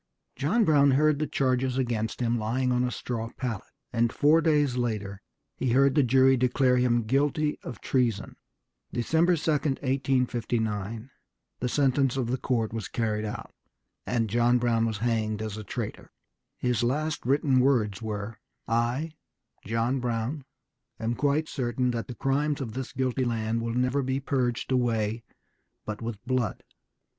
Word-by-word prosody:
John 180 Hz, -, +2 dB
Brown 145 Hz, -3 st, +5 dB
heard 155 Hz, -1 st, +3 dB
the 155 Hz, -, 0 dB
charges 130 Hz, -1 st, 0 dB
against 115 Hz, -3 st, -1 dB
him 120 Hz, -1 st, +1 dB
lying 125 Hz, +4 st, 0 dB
on 125 Hz, 0 st, +2 dB
a 125 Hz, -, +1 dB
straw 115 Hz, -2 st, -4 dB
pallet, 120 Hz, -6 st, -4 dB, 0.3 s
and 115 Hz, 0 st, +2 dB
four 150 Hz, +4 st, +4 dB
days 150 Hz, -5 st, +2 dB
later 105 Hz, -5 st, -2 dB, 0.3 s
he 125 Hz, -3 st, 0 dB
heard 135 Hz, +1 st, +4 dB
the 150 Hz, -, +4 dB
jury 130 Hz, +1 st, +5 dB
declare 125 Hz, 0 st, +2 dB
him 120 Hz, -2 st, +2 dB
guilty 145 Hz, +5 st, +1 dB
of 125 Hz, -, -8 dB
treason. 120 Hz, -6 st, 0 dB, 0.6 s
December 160 Hz, +9 st, +2 dB
2, 160 Hz, 0 st, 0 dB
1859, 125 Hz, -6 st, -1 dB, 0.5 s
the 125 Hz, -, -1 dB
sentence 135 Hz, -1 st, +2 dB
of 120 Hz, -2 st, -1 dB
the 130 Hz, -, -1 dB
court 115 Hz, -4 st, -1 dB
was 110 Hz, -4 st, -4 dB
carried 110 Hz, -2 st, -1 dB
out, 105 Hz, -, -6 dB, 0.5 s
and 115 Hz, -2 st, +1 dB
John 120 Hz, +3 st, +3 dB
Brown 115 Hz, -2 st, +1 dB
was 110 Hz, -2 st, -2 dB
hanged 110 Hz, -2 st, 0 dB
as 110 Hz, -1 st, -4 dB
a 110 Hz, -, -6 dB
traitor. 100 Hz, -, -6 dB, 0.5 s
His 125 Hz, -3 st, 0 dB
last 150 Hz, +6 st, -1 dB
written 135 Hz, 0 st, +3 dB
words 115 Hz, -7 st, +2 dB
were, 105 Hz, -1 st, -5 dB, 0.3 s
"I, 120 Hz, +7 st, 0 dB, 0.6 s
John 115 Hz, +4 st, 0 dB
Brown, 125 Hz, +4 st, -2 dB, 0.5 s
am 115 Hz, +1 st, -1 dB
quite 145 Hz, +5 st, +1 dB
certain 125 Hz, -2 st, -1 dB
that 115 Hz, -1 st, -3 dB
the 125 Hz, -, -7 dB
crimes 140 Hz, +4 st, 0 dB
of 120 Hz, -6 st, -5 dB
this 130 Hz, +1 st, -5 dB
guilty 130 Hz, 0 st, -1 dB
land 115 Hz, -1 st, -1 dB
will 115 Hz, 0 st, -3 dB
never 125 Hz, +3 st, +1 dB
be 130 Hz, 0 st, -1 dB
purged 130 Hz, -3 st, -1 dB
away 115 Hz, -3 st, +1 dB, 0.6 s
but 105 Hz, +1 st, -5 dB
with 115 Hz, -2 st, -4 dB
blood. 125 Hz, -5 st, -1 dB
125 Hz, 155 wpm, -27 LUFS, 115-135 Hz, 0.6 s, Brown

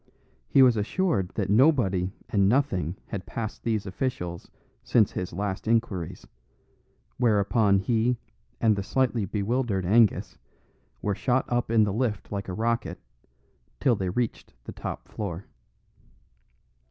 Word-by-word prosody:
He 135 Hz, -, +6 dB
was 125 Hz, -3 st, +5 dB
assured 105 Hz, -, 0 dB
that 100 Hz, -2 st, -1 dB
nobody 105 Hz, -, +3 dB, 0.2 s
and 100 Hz, -2 st, +3 dB
nothing 100 Hz, -, +1 dB
had 100 Hz, -, -5 dB
passed 110 Hz, -1 st, -5 dB
these 110 Hz, -3 st, -1 dB
officials 95 Hz, -4 st, -4 dB, 0.3 s
since 110 Hz, -4 st, +3 dB
his 90 Hz, -1 st, -4 dB
last 100 Hz, +3 st, -3 dB
inquiries; 95 Hz, -6 st, -1 dB, 0.9 s
whereupon 105 Hz, -2 st, +3 dB
he 115 Hz, +4 st, +1 dB, 0.4 s
and 110 Hz, -2 st, +3 dB
the 100 Hz, -, -2 dB
slightly 120 Hz, 0 st, 0 dB
bewildered 105 Hz, 0 st, -1 dB
Angus 100 Hz, -3 st, +3 dB, 0.6 s
were 105 Hz, -, +1 dB
shot 130 Hz, +5 st, +1 dB
up 120 Hz, -1 st, 0 dB
in 115 Hz, -1 st, +4 dB
the 100 Hz, -2 st, 0 dB
lift 110 Hz, -3 st, -2 dB
like 100 Hz, -1 st, -4 dB
a 95 Hz, -, -4 dB
rocket, 115 Hz, +3 st, -1 dB, 0.8 s
till 125 Hz, -, +3 dB
they 95 Hz, -3 st, -2 dB
reached 120 Hz, +5 st, -3 dB
the -, -, -8 dB
top -, -, -6 dB
floor. 95 Hz, -3 st, -5 dB
105 Hz, 130 wpm, -26 LUFS, 95-120 Hz, 0.9 s, He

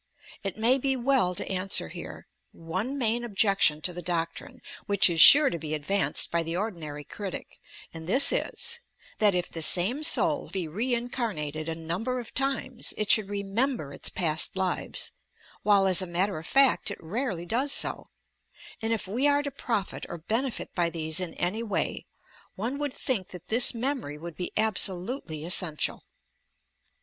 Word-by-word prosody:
It 195 Hz, -1 st, -5 dB
may 240 Hz, +5 st, +3 dB
be 270 Hz, 0 st, 0 dB
well 245 Hz, -8 st, +1 dB
to -, -, -4 dB
answer 185 Hz, -, +2 dB
here -, -, -9 dB, 0.3 s
one 185 Hz, +12 st, -4 dB
main 240 Hz, -2 st, 0 dB
objection 195 Hz, -8 st, +2 dB
to 180 Hz, -, -2 dB
the 175 Hz, -, -6 dB
doctrine 170 Hz, -1 st, -4 dB, 0.3 s
which 200 Hz, -1 st, +4 dB
is 165 Hz, -1 st, +4 dB
sure 290 Hz, 0 st, +9 dB
to 170 Hz, -, -4 dB
be 155 Hz, 0 st, -3 dB
ad 150 Hz, -, -7 dB
vanced 195 Hz, +3 st, +2 dB
by 170 Hz, -, +1 dB
the 165 Hz, +1 st, -4 dB
ordinary 165 Hz, -8 st, -5 dB
critic, 195 Hz, +4 st, -8 dB, 0.3 s
and 160 Hz, 0 st, -9 dB
this 265 Hz, +9 st, +5 dB
is, 470 Hz, 0 st, -1 dB, 0.4 s
that, 205 Hz, -3 st, +4 dB
if 180 Hz, 0 st, -2 dB
the 165 Hz, -, -5 dB
same 190 Hz, -, +4 dB
soul 310 Hz, -1 st, +3 dB
be 185 Hz, -4 st, -3 dB
reincarnated 210 Hz, -, -3 dB
a 165 Hz, -, -3 dB
number 180 Hz, +11 st, -3 dB
of 240 Hz, -, -9 dB
times, 270 Hz, -2 st, -1 dB
it 215 Hz, -, +2 dB
should 210 Hz, -3 st, +4 dB
remember 200 Hz, -, -2 dB
its -, -, -3 dB
past 165 Hz, +1 st, 0 dB
lives, 185 Hz, -1 st, -2 dB, 0.3 s
— -, -, -27 dB
while 200 Hz, -2 st, +4 dB
as 185 Hz, -1 st, +4 dB
a 185 Hz, -, -4 dB
matter 180 Hz, +1 st, -1 dB
of 160 Hz, -, -10 dB
fact 275 Hz, -4 st, +3 dB
it 200 Hz, -, -6 dB
rarely 195 Hz, 0 st, -3 dB
does 255 Hz, +9 st, -1 dB
so, -, -, 0 dB, 0.7 s
and 225 Hz, 0 st, -2 dB
if 220 Hz, -, -3 dB
we 245 Hz, +9 st, +1 dB
are 285 Hz, 0 st, +2 dB
to 285 Hz, -, -4 dB
profit 225 Hz, -7 st, -3 dB
or 170 Hz, -, -6 dB
benefit 225 Hz, +10 st, -3 dB
by 175 Hz, -2 st, +1 dB
these 160 Hz, -1 st, -1 dB
in 180 Hz, -2 st, -3 dB
any 185 Hz, +6 st, -2 dB
way, 225 Hz, -3 st, -3 dB, 0.5 s
one 240 Hz, +8 st, -3 dB
would 290 Hz, -2 st, -2 dB
think 220 Hz, -8 st, -2 dB
that 180 Hz, -1 st, -11 dB
this 240 Hz, +2 st, +4 dB
memory 240 Hz, -, -3 dB
would 170 Hz, +1 st, -9 dB
be 180 Hz, -, -5 dB
absolutely 190 Hz, -, 0 dB
essential. 170 Hz, -3 st, -1 dB
195 Hz, 175 wpm, -27 LUFS, 170-245 Hz, 0.7 s, sure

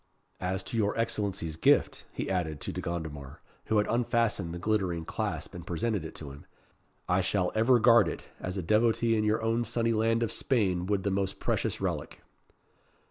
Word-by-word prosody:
As 95 Hz, +1 st, -2 dB
to 115 Hz, -, -5 dB
your 105 Hz, -1 st, +1 dB
Excellency's 100 Hz, -8 st, -1 dB
gift," -, -, +3 dB
he -, -, -4 dB
added 80 Hz, -5 st, -1 dB
to -, -, -3 dB
De -, -, -4 dB
Gondomar, 80 Hz, -5 st, -5 dB, 0.3 s
who 110 Hz, -, +1 dB
had 105 Hz, -, +3 dB
unfastened 115 Hz, -6 st, 0 dB
the 85 Hz, -, -5 dB
glittering 90 Hz, -4 st, -1 dB
clasp -, -, -3 dB
and -, -, -9 dB
presented 100 Hz, +2 st, -1 dB
it 80 Hz, -, -8 dB
to 70 Hz, -3 st, -7 dB
him, 70 Hz, +1 st, -13 dB, 0.6 s
"I 90 Hz, +2 st, +2 dB
shall 90 Hz, -1 st, 0 dB
ever 115 Hz, +3 st, +4 dB
guard 115 Hz, -4 st, +6 dB
it, 80 Hz, -, -5 dB, 0.2 s
as 90 Hz, +1 st, -4 dB
a 95 Hz, -, -2 dB
devotee 115 Hz, +4 st, +3 dB
in 105 Hz, -, +1 dB
your 105 Hz, +1 st, +1 dB
own 115 Hz, +1 st, +1 dB
sunny 115 Hz, 0 st, 0 dB
land 115 Hz, +1 st, +2 dB
of 115 Hz, -, -1 dB
Spain 95 Hz, -8 st, +1 dB
would 100 Hz, -2 st, 0 dB
the 100 Hz, -, 0 dB
most 95 Hz, 0 st, -1 dB
precious -, -, -1 dB
relic." -, -, -3 dB
100 Hz, 190 wpm, -29 LUFS, 90-115 Hz, 0.6 s, guard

